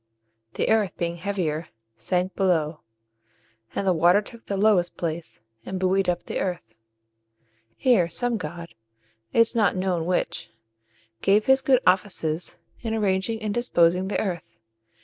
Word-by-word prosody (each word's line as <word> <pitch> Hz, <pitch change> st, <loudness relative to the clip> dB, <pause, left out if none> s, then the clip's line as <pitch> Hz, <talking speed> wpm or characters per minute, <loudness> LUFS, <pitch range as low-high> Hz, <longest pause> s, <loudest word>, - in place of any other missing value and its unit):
The -, -, 0 dB
earth, 220 Hz, -4 st, +2 dB
being 170 Hz, 0 st, -2 dB
heavier, 170 Hz, -4 st, -2 dB, 0.3 s
sank 180 Hz, +5 st, -1 dB
below; 165 Hz, -5 st, +1 dB, 1.0 s
and 200 Hz, -, -1 dB
the 185 Hz, -, +3 dB
water 175 Hz, +4 st, +5 dB
took 230 Hz, +2 st, -11 dB
the 200 Hz, -, -2 dB
lowest 195 Hz, -4 st, +3 dB
place, 165 Hz, -5 st, -4 dB, 0.2 s
and 190 Hz, -1 st, -5 dB
buoyed 190 Hz, 0 st, +2 dB
up 175 Hz, 0 st, -1 dB
the -, -, -4 dB
earth. 115 Hz, -12 st, -4 dB, 1.0 s
Here 210 Hz, -10 st, +3 dB
some 240 Hz, +7 st, 0 dB
god 170 Hz, -1 st, -7 dB, 0.6 s
it -, -, +1 dB
is 230 Hz, +1 st, +3 dB
not 215 Hz, -4 st, +3 dB
known 180 Hz, -3 st, -1 dB
which 180 Hz, -, -1 dB, 0.7 s
gave 205 Hz, +2 st, +3 dB
his 265 Hz, 0 st, +5 dB
good 260 Hz, -1 st, +3 dB
offices 180 Hz, -3 st, 0 dB, 0.2 s
in 225 Hz, -2 st, -3 dB
arranging 210 Hz, +1 st, 0 dB
and 210 Hz, -1 st, -1 dB
disposing 185 Hz, -6 st, +2 dB
the 205 Hz, -, -1 dB
earth. 180 Hz, -, -4 dB
185 Hz, 145 wpm, -25 LUFS, 170-210 Hz, 1.0 s, water